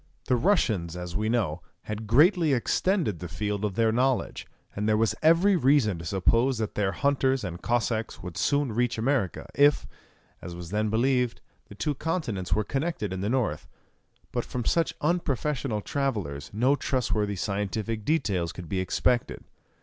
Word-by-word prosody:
The 125 Hz, -, +2 dB
Russians, 110 Hz, -, +1 dB
as 90 Hz, -1 st, -6 dB
we 110 Hz, +1 st, 0 dB
know, 95 Hz, -9 st, 0 dB, 0.2 s
had 110 Hz, 0 st, -5 dB
greatly 155 Hz, -, +4 dB
extended 135 Hz, -, +1 dB
the 90 Hz, -, -5 dB
field 105 Hz, +4 st, -3 dB
of 105 Hz, -3 st, -1 dB
their 115 Hz, -1 st, +3 dB
knowledge, 130 Hz, +2 st, 0 dB, 0.3 s
and 105 Hz, +2 st, -1 dB
there 105 Hz, -, +3 dB
was 110 Hz, 0 st, +2 dB
every 170 Hz, +5 st, +5 dB
reason 130 Hz, -, +3 dB
to 85 Hz, -, -8 dB
suppose 115 Hz, +8 st, +2 dB
that 110 Hz, -2 st, -3 dB
their 100 Hz, -2 st, 0 dB
hunters 135 Hz, 0 st, +1 dB
and 85 Hz, -2 st, -5 dB
Cossacks 115 Hz, -3 st, -1 dB
would 90 Hz, -2 st, -7 dB
soon 135 Hz, +5 st, +1 dB
reach 120 Hz, +2 st, 0 dB
America, 115 Hz, -, 0 dB
if, 145 Hz, +1 st, +4 dB, 0.6 s
as 85 Hz, 0 st, -7 dB
was 85 Hz, -1 st, -8 dB
then 105 Hz, +1 st, 0 dB
believed, 125 Hz, +2 st, +1 dB, 0.3 s
the 100 Hz, -, -12 dB
two 150 Hz, +8 st, -1 dB
continents 140 Hz, -, -3 dB
were 110 Hz, -, +2 dB
connected 135 Hz, -, -2 dB
in 95 Hz, -, -4 dB
the 100 Hz, -, -1 dB
north. 125 Hz, -3 st, -1 dB, 0.6 s
But -, -, -1 dB
from 120 Hz, -2 st, -5 dB
such 165 Hz, -2 st, +1 dB
unprofessional 145 Hz, -7 st, -1 dB
travellers 100 Hz, -, -3 dB
no 125 Hz, +7 st, +2 dB
trustworthy 110 Hz, -7 st, -1 dB
scientific 105 Hz, +3 st, -2 dB
details 100 Hz, -, 0 dB
could 90 Hz, -2 st, -9 dB
be 95 Hz, -, -2 dB
expected. 120 Hz, +6 st, 0 dB
115 Hz, 165 wpm, -27 LUFS, 100-135 Hz, 0.6 s, every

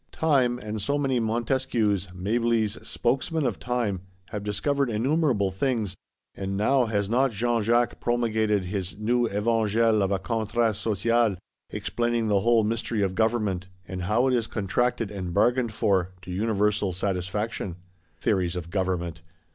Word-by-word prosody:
Time, 135 Hz, -6 st, +2 dB
and 105 Hz, -2 st, -5 dB
so 140 Hz, +8 st, 0 dB
many 135 Hz, -3 st, +1 dB
Montesquieus, 115 Hz, -3 st, 0 dB
Mablys, 110 Hz, +3 st, 0 dB
spokesmen 135 Hz, +5 st, 0 dB
of 120 Hz, -5 st, -1 dB
Time, 120 Hz, -7 st, -1 dB, 0.3 s
have 105 Hz, -2 st, -5 dB
discovered 140 Hz, +6 st, 0 dB
innumerable 120 Hz, -, +1 dB
things: 110 Hz, 0 st, -1 dB, 0.4 s
and 95 Hz, 0 st, -4 dB
now 125 Hz, +4 st, +3 dB
has 100 Hz, -2 st, 0 dB
not 130 Hz, +5 st, +3 dB
Jean 115 Hz, +1 st, 0 dB
Jacques 120 Hz, +3 st, +2 dB
promulgated 110 Hz, -4 st, +1 dB
his 95 Hz, -1 st, -4 dB
new 120 Hz, +3 st, +1 dB
Evangel 110 Hz, +1 st, +2 dB
of 95 Hz, 0 st, +1 dB
a 100 Hz, -, +2 dB
Contrat 110 Hz, +2 st, 0 dB
Social; 115 Hz, +1 st, +1 dB, 0.3 s
explaining 120 Hz, -2 st, -1 dB
the 100 Hz, -1 st, +4 dB
whole 115 Hz, +1 st, +3 dB
mystery 110 Hz, 0 st, -1 dB
of 95 Hz, -1 st, 0 dB
Government, 105 Hz, -4 st, 0 dB, 0.2 s
and 95 Hz, -1 st, -5 dB
how 105 Hz, +8 st, +2 dB
it 130 Hz, -, +2 dB
is 115 Hz, -2 st, +1 dB
contracted 115 Hz, +1 st, -1 dB
and 90 Hz, -4 st, -5 dB
bargained 120 Hz, +2 st, +3 dB
for,—to 95 Hz, -4 st, -1 dB
universal 105 Hz, 0 st, +1 dB
satisfaction? 95 Hz, +1 st, -2 dB, 0.4 s
Theories 90 Hz, -2 st, +1 dB
of 85 Hz, -1 st, -5 dB
Government! 90 Hz, -3 st, -2 dB
110 Hz, 140 wpm, -26 LUFS, 100-120 Hz, 0.4 s, the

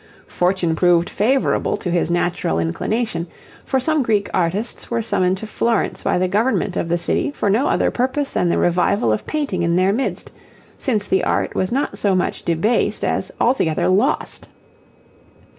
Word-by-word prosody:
Fortune 180 Hz, -2 st, 0 dB
proved 175 Hz, 0 st, +3 dB
favourable 260 Hz, +6 st, +1 dB
to 180 Hz, -, -3 dB
his 170 Hz, -1 st, +1 dB
natural 175 Hz, -, 0 dB
inclination, 170 Hz, -, -2 dB, 0.4 s
for 265 Hz, -, 0 dB
some 310 Hz, +3 st, +1 dB
Greek 215 Hz, -5 st, 0 dB
artists 185 Hz, +7 st, -2 dB
were 235 Hz, -1 st, -1 dB
summoned 190 Hz, -3 st, +1 dB
to 220 Hz, -, -6 dB
Florence 230 Hz, +1 st, -1 dB
by -, -, +1 dB
the 185 Hz, +1 st, +1 dB
government 205 Hz, -1 st, 0 dB
of 170 Hz, -, -2 dB
the 175 Hz, -, +2 dB
city 175 Hz, -, -1 dB
for 210 Hz, -8 st, -1 dB
no 235 Hz, +8 st, +2 dB
other -, -, +1 dB
purpose 270 Hz, +3 st, -1 dB
than 175 Hz, -, +1 dB
the -, -, +1 dB
revival 175 Hz, -, +2 dB
of 110 Hz, -, -4 dB
painting 285 Hz, -, -2 dB
in 170 Hz, 0 st, +1 dB
their 185 Hz, +2 st, +3 dB
midst, 260 Hz, +5 st, -3 dB, 0.4 s
since 215 Hz, -7 st, -1 dB
the 190 Hz, -, +1 dB
art -, -, 0 dB
was 185 Hz, -, -1 dB
not 275 Hz, +4 st, -1 dB
so 200 Hz, -2 st, +2 dB
much 180 Hz, -, -1 dB
debased 170 Hz, +8 st, 0 dB
as -, -, -1 dB
altogether 175 Hz, -11 st, +1 dB
lost. 210 Hz, +11 st, 0 dB
195 Hz, 170 wpm, -20 LUFS, 175-235 Hz, 0.4 s, proved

